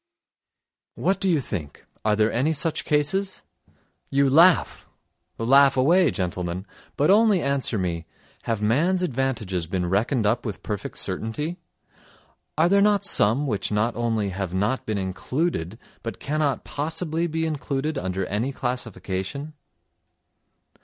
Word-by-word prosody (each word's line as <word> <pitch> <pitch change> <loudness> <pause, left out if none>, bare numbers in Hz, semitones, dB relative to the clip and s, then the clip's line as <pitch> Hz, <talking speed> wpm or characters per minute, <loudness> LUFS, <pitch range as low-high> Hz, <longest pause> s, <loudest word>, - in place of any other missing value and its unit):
What 190 +2 0
do 190 - +2
you 165 -4 +3
think—are 100 - -4
there 115 +8 +2
such 160 +2 -1
cases? 185 +7 0 0.7
You 140 -1 +2
laugh; 170 +3 +4 0.5
laugh 135 +4 +5
away, 170 +6 +4
gentlemen, 90 -2 -3 0.3
but 150 +5 +4
only 210 -2 +5
answer 140 -5 0
me: 85 -3 -3 0.4
have 110 -2 -1
man's 170 - +2
advantages 120 - -1
been 90 0 -1
reckoned 110 +6 +1
up 115 +4 +1
with 105 -5 -6
perfect 105 -2 -5
certainty? 150 +10 -3 1.0
Are 160 +2 +4
there 200 +2 +4
not 205 0 +3
some 130 - +2
which 105 -8 -2
not 105 +3 +1
only 115 -3 0
have 95 -1 -4
not 105 +7 -1
been 110 -1 -1
included 95 - -2 0.2
but 115 - -6
cannot 150 -1 -1
possibly 160 +3 -2
be 160 0 -1
included 150 -1 -2
under 95 -7 -2
any 110 +7 -2
classification? 125 +1 -4
130 Hz, 125 wpm, -24 LUFS, 105-155 Hz, 1.0 s, laugh